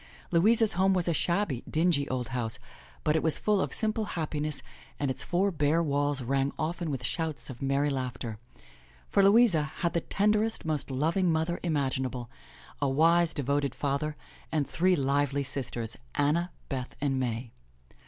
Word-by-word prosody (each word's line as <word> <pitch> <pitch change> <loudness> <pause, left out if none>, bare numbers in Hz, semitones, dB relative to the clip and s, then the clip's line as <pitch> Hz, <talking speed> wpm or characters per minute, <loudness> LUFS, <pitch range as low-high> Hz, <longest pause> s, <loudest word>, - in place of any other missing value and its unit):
Louisa's 215 +6 +4
home 190 +2 +3
was 180 -2 +1
a 170 - +2
shabby, 170 - 0
dingy 160 -3 +2
old 125 -2 -2
house, 115 -2 -2 0.5
but 150 - +2
it 160 - +2
was 160 - +3
full 210 -2 +2
of - - -1
simple 220 -1 0
happi 155 -2 -2
ness 150 -1 -3 0.4
and 140 -2 0
its - - -3
four 190 +3 +1
bare 155 +1 +2
walls 145 -2 0
rang 135 +2 +1
often 165 +1 -2
with 135 -3 -3
shouts 160 -1 -2
of 120 - -11
merry 140 +2 +1
laugh 130 -2 -3
ter. 110 -5 -6 0.7
For - - +4
Louisa 200 -4 +5
had 160 +3 -2
the 170 - +1
tenderest, 210 +3 +1
most 155 -3 -2
loving 165 +7 +1
mother 160 +2 0
imaginable, 130 -6 -1 0.5
a 140 - +2
wise, 165 +4 +4
devoted 140 -1 -1
father 145 +2 -1 0.4
and 155 -3 0
three 185 +2 +2
lively 140 0 +1
sisters, 120 -4 -4 0.2
Anna, 155 +5 +2 0.2
Beth 130 -3 -4
and 135 -2 0
May. 120 -1 -3
150 Hz, 165 wpm, -29 LUFS, 135-170 Hz, 0.7 s, Louisa